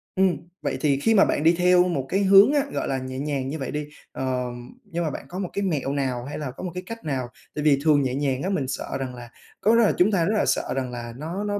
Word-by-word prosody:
ừm, 190 -2 +3 0.2
vậy - - -2
thì 140 -3 +2
khi 225 - +3
mà 200 - +6
bạn 145 - 0
đi 165 +2 +5
theo 180 0 +5
một 140 -7 -1
cái 195 - +1
hướng 195 +7 +7
á, 290 -2 +3
gọi - - -2
là, 135 - -1
nhẹ 130 0 -6
nhàng 140 -2 -2
như 155 +1 -4
vậy 135 - -4
đi, 150 0 -3 0.2
ờm, 125 -2 -4
nhưng 170 +1 -3
mà 155 - 0
bạn - - -7
có 180 - -5
một 185 -3 -3
cái 200 - -1
mẹo 145 -7 -1
nào 130 -4 -2
hay 145 - -6
là 145 -4 -4
có 130 - -10
một 180 - -3
cái 180 - -5
cách 230 0 -7
nào? 130 -4 -2 0.3
Tại 150 - -2
vì 145 -3 +4
thường 150 -2 +4
nhẹ 130 -1 -1
nhàng 135 -2 -1
á 190 - -1
mình 145 -9 -1
sợ - - -4
rằng 130 -2 -4
là 120 -1 -10 0.3
có 220 +2 +4
đó 235 - +5
là 215 - +4
chúng 190 +4 +4
ta 175 -4 +2
rất 215 +4 +1
là - - +2
sợ - - 0
rằng 130 -2 -2
là 120 -1 -6
nó 165 +8 -4
nó 205 -1 -1
150 Hz, 295 wpm, -24 LUFS, 130-185 Hz, 0.3 s, hướng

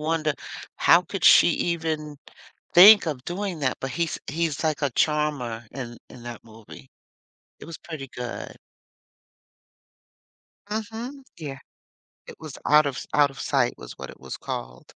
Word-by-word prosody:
wonder, 155 -1 0 0.4
"How 170 +2 +5
could 185 +2 -5
she - - +8
even 160 -3 -2 0.6
think 200 +1 +9
of 135 -5 -4
doing 180 -2 -4
that?" 130 -2 0
But 135 - -4
he's 170 -2 -2
he's 160 0 -2
like 155 -1 0
a 140 - +1
charmer 140 -6 -1
in 120 -3 -7
in 120 - -12
that 120 -1 -8
movie. 110 - -14 0.7
It - - -10
was 165 - -8
pretty 150 -5 -8
good. 125 -1 -6 2.2
Mhm. 230 +5 -5
Yeah. 140 -4 -6 0.7
It - - -10
was 155 -3 -9
Out 150 0 +6
of 135 -3 -4
Out 145 -1 +4
of 135 - -13
Sight - - +1
was - - -10
what - - -8
it - - -13
was - - -7
called. - - -6
150 Hz, 150 wpm, -25 LUFS, 130-170 Hz, 2.2 s, think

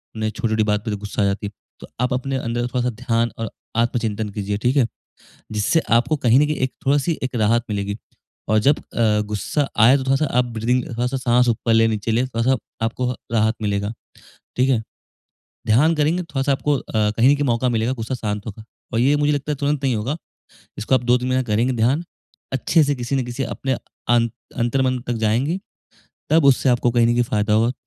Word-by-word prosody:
उन्हें 110 0 -1
छोटी-छोटी 110 0 0
बात 105 +1 0
पे 110 - -2
गुस्सा 105 +1 -4
आ - - +3
जाती 100 +1 -1
है। - - -8 0.3
तो - - -11
आप 125 0 +1
अपने 130 +1 -2
अंदर 120 0 -2
थोड़ा-सा 125 0 -1
ध्यान 115 -1 0
और 115 -2 -3 0.3
आत्मचिंतन 115 -3 0
कीजिए 100 0 -3
ठीक 125 +2 +2
है। 130 - +5 0.7
जिससे 110 +10 +1 0.2
आपको 140 +6 +1
कहीं 125 -1 +4
न 150 - +4
कहीं 155 - -1
एक 130 - -7
थोड़ी-सी 145 +4 +2
एक 130 -1 -3
राहत 115 +1 +2
मिलेगी 100 0 -2 0.5
और 110 0 +4
जब 140 +7 +3
अ, 105 -2 0
गुस्सा 135 +7 -1
आया 125 +6 +7
तो 135 - -3
थोड़ा-सा 135 +3 +2
आप 125 - +2
ब्रीथिंग 125 +3 +1
थोड़ा-सा 125 +2 -1
साँस 125 0 +2
ऊपर 115 0 +1
लें-नीचे 115 -1 +2
ले, 120 +3 +2
थोड़ा-सा 125 +1 +1 0.3
आपको 125 +2 -1 0.2
राहत 110 0 +2
मिलेगा, 100 +1 -1 0.6
ठीक 130 +2 +2
है? 115 -4 +2 0.8
ध्यान 145 +10 +4
करेंगे 160 +4 +1
थोड़ा-सा 140 -3 -1
आपको 145 +1 +1
अ, - - -6 0.3
कहीं 130 +5 +5
का 145 - -1
मौका 125 0 +1
मिलेगा 115 +1 0
गुस्सा 115 +4 -3
शांत 105 -3 -4
होगा। 110 +1 -8 0.3
और 115 - +1
ये 140 +4 +4
मुझे 145 0 +2
लगता 145 +1 -2
है 145 - -3
तुरंत 145 0 -1
नहीं 130 -3 +2
होगा। 125 +9 -2 0.6
इसको 115 +5 +1
आप - - -2
2-3 125 +1 +2
महीना 130 0 +1
करेंगे 115 +3 +1
ध्यान 130 +9 +1 0.5
अच्छे 135 +4 +3
से 145 0 +1
किसी 125 +2 -2
न 130 - 0
किसी 120 +2 -4
अपने 135 +3 -3 0.4
अं 120 -1 +4 0.3
अंतरम 130 +2 +1
तक 120 - -3
जाएँगी 135 - +1 0.7
तब 160 -2 +4
उससे 135 0 +4
आपको 120 0 +2
कहीं 120 -1 +3
न 120 - +3
कहीं 120 0 +2
फ़ायदा 105 -2 0
होगा। 115 +3 +3
120 Hz, 200 wpm, -21 LUFS, 110-135 Hz, 0.8 s, आया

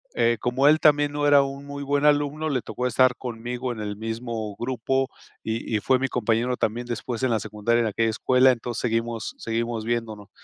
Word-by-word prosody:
eh, 115 -1 +2
como 130 +3 +2
él 155 +1 +6
también 145 -1 +4
no 145 0 0
era 145 -1 +6
un 140 +1 -6
muy 140 0 -6
buen 145 +1 0
alumno, 150 +1 +2
le 130 -4 0
tocó 125 0 -3
estar 125 +1 +3
conmigo 125 +1 -4
en 115 - -6
el 105 -1 -4
mismo 110 -1 -4
grupo 130 +2 -1 0.3
y 110 0 -2
y - - -1
fue 130 +4 +2
mi 135 - 0
compañero 120 0 0
también 120 +3 -2
después 120 +1 -4
en 130 - +1
la 115 -2 +1
secundaria 110 +3 0
en 115 - +1
aquella 115 +2 0
escuela, 130 +4 +4
entonces 120 -1 -4
seguimos 115 -1 -2
seguimos 115 0 -3
viéndonos, 110 -3 -3
120 Hz, 200 wpm, -24 LUFS, 115-135 Hz, 0.3 s, él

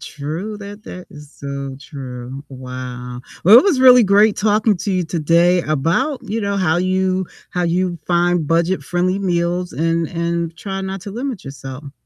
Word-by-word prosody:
True, 165 +9 -5
that 205 +1 -10
that 180 0 -9
is 150 -1 -13
so 140 -1 -6
true. 130 -1 -8
Wow. 125 -1 -7 0.2
Well, 215 +6 +10
it - - +3
was 315 -10 +2
really 250 -3 +8
great 205 +2 +4
talking 210 -1 +2
to 200 - -2
you 180 -2 0
today 170 +2 +3
about, 170 - 0
you 225 0 -3
know, 200 -1 -1
how 175 -4 +2
you 185 0 0 0.2
how 180 -1 -1
you 175 0 0
find 175 -2 +2
budget-friendly 175 +2 0
meals 175 -1 -1
and 165 0 0
and 170 -1 -2
try 195 +2 -5
not 190 0 -4
to 200 - -7
limit 240 - -5
yourself. 135 +1 -8
175 Hz, 165 wpm, -19 LUFS, 150-195 Hz, 0.2 s, Well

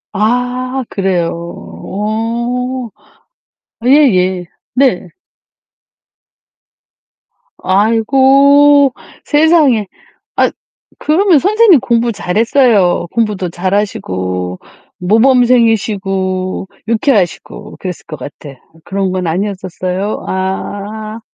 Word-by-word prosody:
아 250 +4 -1
그래요. 185 -4 -1 0.5
어 235 +4 -3 1.0
예예. 190 -10 +3 0.3
네. 250 -9 +1 2.5
아이고 270 +7 +4 0.3
세상에. 295 - +3 0.5
아 - - +3 0.5
그러면 340 +1 +3
선생님 410 - +4
공부 235 0 0
잘했어요. 210 -3 +2
공부도 210 -6 -1
잘하시고 95 - -3 0.4
모범생이시고 210 -5 +1 0.2
유쾌하시고 220 - -1
그랬을 180 -2 -6
것 155 - -7
같아. 140 -2 -10 0.3
그런 195 -1 -2
건 185 -1 -2
아니었었어요? 185 +2 -3
아. 205 +3 -4
215 Hz, 170 characters per minute, -14 LUFS, 185-255 Hz, 2.5 s, 아이고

